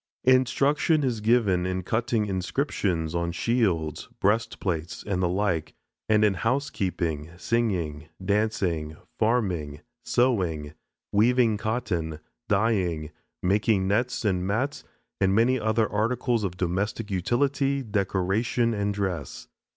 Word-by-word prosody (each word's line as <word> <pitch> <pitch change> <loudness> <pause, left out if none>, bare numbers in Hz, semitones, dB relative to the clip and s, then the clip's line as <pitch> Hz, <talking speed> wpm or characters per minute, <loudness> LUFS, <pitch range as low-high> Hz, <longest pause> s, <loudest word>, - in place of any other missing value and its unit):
Instruction 140 +4 +3
is 120 -5 -1
given 105 -6 +2
in 95 0 -2
cutting 115 +2 0
inscriptions 95 - -1
on 85 0 -1
shields, 90 - 0
breastplates, 95 -6 -1
and 100 -3 -1
the 90 - +2
like, 90 -5 -1 0.3
and 105 0 +5
in 105 - +3
housekeeping, 95 - -1
singing, 90 -10 -1 0.2
dancing, 95 -7 0 0.2
farming, 90 -11 0 0.2
sewing, 90 - +1 0.4
weaving 115 +1 +4
cotton, 90 -8 -2 0.3
dyeing, 95 -8 +1 0.3
making 100 +1 +2
nets 120 +4 0
and 90 -2 +1
mats 130 +8 -1 0.4
and 95 0 +3
many 125 +4 +3
other 110 0 +1
articles 115 +2 0
of 90 -2 -3
domestic 100 +4 -2
utility, 135 +8 +1
decoration, 105 +3 0
and 100 -1 -1
dress. 90 -9 -4
100 Hz, 110 wpm, -26 LUFS, 90-115 Hz, 0.4 s, and